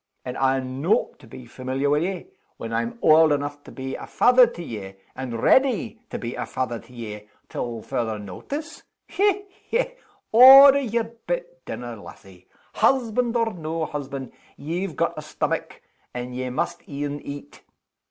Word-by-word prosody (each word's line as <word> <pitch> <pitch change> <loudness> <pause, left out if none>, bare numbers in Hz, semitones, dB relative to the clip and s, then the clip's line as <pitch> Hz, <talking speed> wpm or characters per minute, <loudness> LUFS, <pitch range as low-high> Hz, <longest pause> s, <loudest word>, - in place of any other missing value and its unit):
Am 125 - -5
I 135 0 +2
no' 135 - 0
to - - -16
be 125 +2 -11
familiar 130 +3 -3
wi' 145 +1 +3
ye 185 +3 -3 0.3
when 115 - -6
I'm 115 +1 -2
auld 155 0 +6
eneugh 145 0 -3
to - - -11
be 130 0 -6
a - - -7
fether 250 0 +5
to 175 -7 -8
ye, 100 -8 -7 0.2
and 120 -3 -5
ready 235 -4 +3
to - - -4
be 120 +1 -5
a - - -4
fether 125 -3 -3
to - - -18
ye 105 -3 -8 0.2
till 115 -2 -4
further 115 -5 -2
notice? 280 - -7 0.3
Hech! 405 0 +1 0.3
hech! - - -1 0.3
Order 270 +4 +10
your 235 -3 -1
bit - - -6
dinner 120 -1 -6
lassie. 95 -2 -14 0.3
Husband 240 0 +2
or 230 -1 0
no 160 -1 -3
husband, 140 -3 -6 0.3
ye've 170 +3 -4
got - - 0
a - - -5
stomach, - - -3 0.3
and 125 0 -5
ye 130 0 -3
must 125 - -2
een 145 0 -4
eat. 145 0 -9
145 Hz, 160 wpm, -24 LUFS, -, 0.3 s, Order